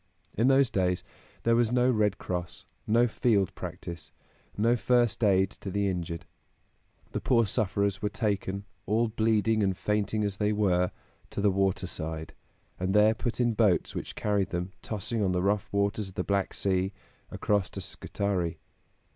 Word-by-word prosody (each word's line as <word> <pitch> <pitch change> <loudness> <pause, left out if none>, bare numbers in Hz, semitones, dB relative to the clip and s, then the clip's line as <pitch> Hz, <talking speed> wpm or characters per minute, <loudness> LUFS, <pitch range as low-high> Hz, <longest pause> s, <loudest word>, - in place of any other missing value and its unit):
In 115 +4 +3
those 135 -1 +4
days 90 -2 +1 0.4
there 115 0 +4
was 120 -1 +2
no 125 0 +3
Red 105 -4 +2
Cross, 90 -1 -5 0.2
no 120 +3 +4
field 105 -4 +1
practice, 85 -3 -7 0.5
no 115 +4 +3
first 120 -1 +2
aid 95 -1 +4
to 100 - -8
the 100 +1 0
injured. 85 -3 -3 0.9
The - - -3
poor 115 -3 +3
sufferers 100 -1 0
were 105 - 0
taken, 100 -1 -2 0.2
all 115 +2 +2
bleeding 110 0 +2
and 95 -2 +1
fainting 105 0 0
as 100 -2 -2
they 105 0 +1
were, 90 -4 +2 0.4
to - - -5
the 100 0 +3
water 95 -1 +1
side, 80 -2 -4 0.5
and 95 +2 0
there 105 +1 +6
put 120 +1 -3
in 120 -2 +2
boats 105 -5 +2
which - - -5
carried 100 -2 0
them, 90 +2 -3
tossing 110 +1 -3
on 95 -2 +1
the 90 0 0
rough 100 +1 0
waters 100 0 0
of 95 - -16
the 90 - -1
Black 100 0 0
Sea, 95 0 0 0.4
across 100 -2 0
to - - -7
Scutari. 90 0 -2
100 Hz, 165 wpm, -28 LUFS, 95-110 Hz, 0.9 s, there